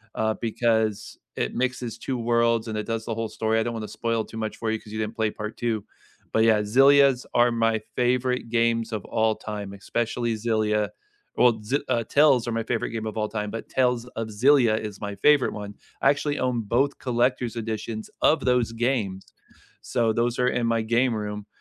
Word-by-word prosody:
uh, 110 0 +1
because 110 -2 0 0.2
it - - -2
mixes 125 -2 -2
2 130 +2 -3
worlds 115 -1 +1
and 110 -1 -3
it 105 - -3
does 115 -1 -3
the 115 - -2
whole 115 0 -3
story; 110 0 0
I - - +1
don't 120 - -3
wanna 110 -2 -5
spoil 115 +1 -1
too 115 - -10
much 110 -1 -4
for 110 -1 -2
you 110 - -1
'cause 105 - -13
you 110 - -3
didn't 110 +1 -3
play 110 -2 0
part 105 +1 -6
2, 115 -4 -2 0.5
but 110 - +3
yeah, 110 -2 +4
Xillias 135 +4 +5
are 120 0 +4
my 115 -1 +1
favorite 125 -1 0
games 115 -1 +1
of 105 -3 -3
all 110 -1 +1
time, 105 -2 -6
especially 115 +3 -2
Xillia 105 -2 0 0.5
Well, 120 -3 +4
Xi 130 +7 0
uh, 115 - +1
Tales 140 -2 +4
are - - -1
my 115 - 0
favorite 115 0 -2
game 110 -1 -4
of 110 - -5
all 105 -1 0
time, 105 -1 -3
but 115 - -6
Tales 125 -2 +1
of 115 -1 -3
Xillia 115 0 +4
is 105 -2 -7
my 100 -1 -4
favorite 145 +6 +4
1; 105 -1 -7 0.3
I 135 - +5
actually 145 0 -2
own 125 -2 0
both 130 +7 0
collector's 125 -1 0
editions 110 -1 -4
of 155 - +3
those 125 -3 +2
games, 115 -6 -2 0.5
so 115 -2 0
those 120 +1 0
are 125 - +3
in 120 -2 0
my 115 -1 +1
game 120 +2 +2
room. 105 -1 -5
115 Hz, 205 wpm, -25 LUFS, 110-120 Hz, 0.5 s, Xillias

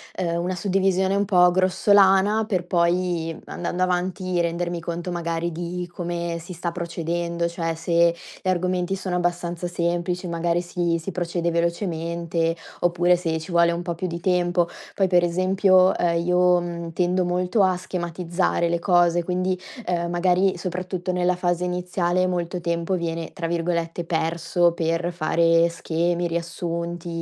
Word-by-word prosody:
ehm, 170 -2 -1
una 185 +1 -2
suddivisione 190 0 +1
un 200 - +1
po' 180 -3 +5
grossolana, 195 +3 +4
per 185 -5 -1
poi, 170 -2 0
andando 175 +1 -2
avanti 185 0 -1
rendermi 170 0 -1
conto 170 +2 -4
magari 170 0 -2
di 175 +2 -4
come 170 -1 -3
si 170 +2 -9
sta 170 0 -3
procedendo, 170 0 -2
cioè 165 -1 -3
se 170 +1 +2 0.3
gli - - -6
argomenti 185 +1 0
sono 185 -2 -2
abbastanza 175 0 -2
semplici 175 +1 -2
magari 170 +1 0
si 175 -1 -1
si 165 +4 -6
procede 170 -1 -1
velocemente 170 -1 -1 0.3
oppure 175 0 +3
se 165 -2 -1
ci 160 +3 -7
vuole 170 0 +4
un 170 - -3
po' 170 -2 -3
più 185 +2 -3
di 170 0 -5
tempo. 175 -1 +1 0.3
Poi, 195 -1 +2
per 175 -1 +4
esempio, 185 +1 +4
ehm, 170 -1 +1
io, 180 0 +4
mhmm, 170 -1 -5
tendo 180 +1 +1
molto 180 +3 +1
a 185 -1 +3
schematizzare 175 -1 -1
le 170 0 0
cose, 175 -2 +3
quindi, 185 +1 -1 0.3
ehm, 170 -1 0
magari, 180 +2 +2
soprattutto 185 +1 -3
nella 180 0 +1
fase 180 0 0
iniziale, 180 0 0
molto 175 0 -2
tempo 170 +2 -1
viene 165 -1 -4
tra 170 - -4
virgolette, 170 0 -2
"perso", 165 +1 +1
per 165 +1 -1
fare 165 0 +3
schemi, 170 +1 -1
riassunti, 170 0 -4
175 Hz, 150 wpm, -23 LUFS, 170-180 Hz, 0.3 s, po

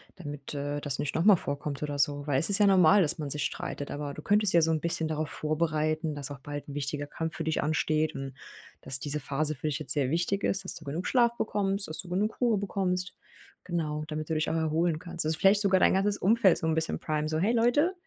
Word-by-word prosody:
damit, 145 -5 -8
äh, 145 +1 -3
das 145 -2 -1
nicht 145 - -2
noch 165 - +1
mal 205 -2 +8
vorkommt 145 -2 -4
oder 145 -1 -3
so. 145 0 +1
Weil 140 -3 +1
es 165 - -1
ist 200 +1 +3
ja 205 - +5
normal, 190 +1 +6
dass 165 0 +3
man 145 -2 -3
sich 145 +1 -2
streitet, 145 - -4
aber 145 -1 -4
du 150 - -8
könntest 205 0 +3
ja 170 - +6
so 160 0 +2
'n 160 - +1
bisschen 165 -1 -1
darauf 155 -1 -2
vorbereiten, 155 0 -1
dass 145 -1 -6
auch 140 - -7
bald 145 +1 -7
'n 140 - -7
wichtiger 145 0 -3
Kampf 160 +1 -4
für 165 - -3
dich 160 0 0
ansteht 155 0 0
und 135 -1 -5 0.5
dass 130 0 -2
diese 150 +2 -3
Phase 145 +2 -2
für 150 +3 -4
dich 150 0 -2
jetzt 155 - -1
sehr 140 -4 0
wichtig 175 +5 0
ist, 195 0 0
dass 185 - -4
du 160 - -9
genug 160 +7 -4
Schlaf 235 -2 +3
bekommst, 200 -1 -1
dass 155 - -5
du 185 - -6
genug 205 +5 -1
Ruhe 235 -4 +3
bekommst. 185 -2 -2 0.5
Genau, 155 -4 -2
damit 155 0 -5
du - - 0
dich 155 - 0
auch 160 - -1
erholen 160 0 0
kannst. 170 -2 -3
Dass 155 - +1
du - - -4
vielleicht 200 +2 +6
sogar 190 -2 +3
dein - - +4
ganzes 200 +2 +1
Umfeld 200 -2 +4
so - - -3
'n 160 - +1
bisschen 160 0 -1
primen 155 -1 -2
so: 155 0 -1
„Hey 210 +7 +2
Leute, 245 +10 +3
160 Hz, 255 wpm, -28 LUFS, 145-190 Hz, 0.5 s, mal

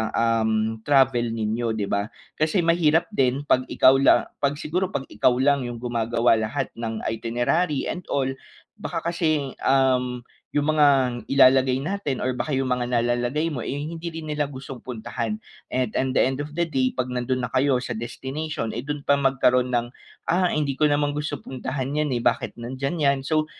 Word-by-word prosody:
ah, 115 -1 +2
um, 110 0 0
travel 135 -4 +4
ninyo, 115 0 -1
'di 105 -2 -3
ba? 100 +1 0 0.3
Kasi 160 +4 +2
mahirap 165 0 +2
din 135 -6 +1
'pag 130 -3 +2
ikaw 135 +1 +5
lang, 135 - +4
'pag 140 0 +1
siguro, 180 +6 -1
'pag - - -1
ikaw 115 +4 +3
lang 140 -3 +2
'yong 120 - -5
gumagawa 115 -1 +1
lahat 110 0 -2
ng 115 -1 -4
itinerary 120 +7 0
and 180 - -5
all, 135 -2 0 0.5
baka 170 -3 -3
kasing, 155 -5 0
um, 125 -2 +2 0.3
'yong 145 0 0
mga 150 -1 +4 0.4
ilalagay 130 -1 +5
natin 150 -2 -3
or 130 - 0
baka 135 +2 -2
'yong 135 - 0
mga 125 -1 -1
nalalagay 120 +6 0
mo 125 - -3
eh, - - -5 0.2
hindi 165 +1 -5
rin 165 -1 -7
nila 150 -1 -1
gustong 135 -2 -9
puntahan. 115 -2 -4 0.3
And, 125 -2 0
in 130 - 0
the - - +5
end 130 +1 -2
of 150 +2 -8
the 170 - +2
day, 135 -5 +1
'pag 125 - 0
nandun 125 0 -1
na 120 - -10
kayo 135 0 +3
sa 125 - -3
destination 130 +2 -4
eh, 120 - -3
dun 145 +1 -5
pa 140 - +4
magkaroon 125 -2 +2
ng, 120 0 -1 0.4
ah, 180 0 +3
hindi 150 -4 0
ko 150 +3 +2
naman 145 0 +1
gusto 150 -1 -3
puntahan 135 +1 -4
yan, 150 - -1
eh, 120 - -4
bakit - - 0
nandyan 130 +6 -4
yan? 140 -3 +2
So 155 +3 0
130 Hz, 185 wpm, -24 LUFS, 120-150 Hz, 0.5 s, ikaw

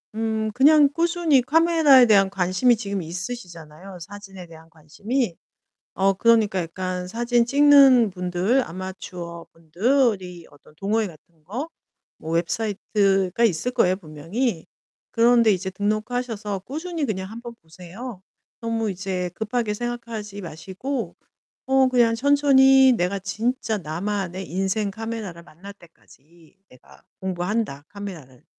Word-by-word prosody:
음 220 -1 -1
그냥 290 +3 +5
꾸준히 335 -5 +2
카메라에 310 -2 +5
대한 195 -3 +4
관심이 190 +6 +2
지금 200 -3 -4
있으시잖아요, 175 -1 -8
사진에 195 -1 -10
대한 160 0 -15
관심이. 175 - -3 0.6
어, 195 +1 +2
그러니까 215 -2 +2
약간 180 +2 -5
사진 235 +2 +1
찍는 275 -5 +6
분들 180 +8 0
아마추어분들이 180 - -3
어떤 145 +1 -21
동호회 210 +3 0
같은 160 -2 -16
거 250 - -5 0.5
뭐 160 +1 -6
웹사이트가 195 +2 0
있을 225 +4 +1
거예요, 185 -4 +2
분명히. 165 - -4 0.5
그런 235 +1 +4
데 215 - +5
이제 190 0 -3
등록하셔서 215 +1 -3
꾸준히 320 +2 -4
그냥 190 -2 -4
한번 235 +1 -9
보세요. 185 +6 -10 0.4
너무 225 -2 -2
이제 185 -1 -3
급하게 220 0 -2
생각하지 230 -3 -6
마시고 190 - -5 0.5
어 265 0 +4
그냥 240 -3 +3
천천히 270 0 +5
'내가 195 -2 -1
진짜 220 +3 -2
나만의 185 +2 -4
인생 195 +2 -1
카메라를 220 -6 -6
만날 180 +5 -13
때까지 165 -1 -22
내가 125 - -20 0.2
공부한다, 185 -3 -3
카메라를.' 170 -12 -10
205 Hz, 295 characters per minute, -23 LUFS, 180-240 Hz, 0.6 s, 찍는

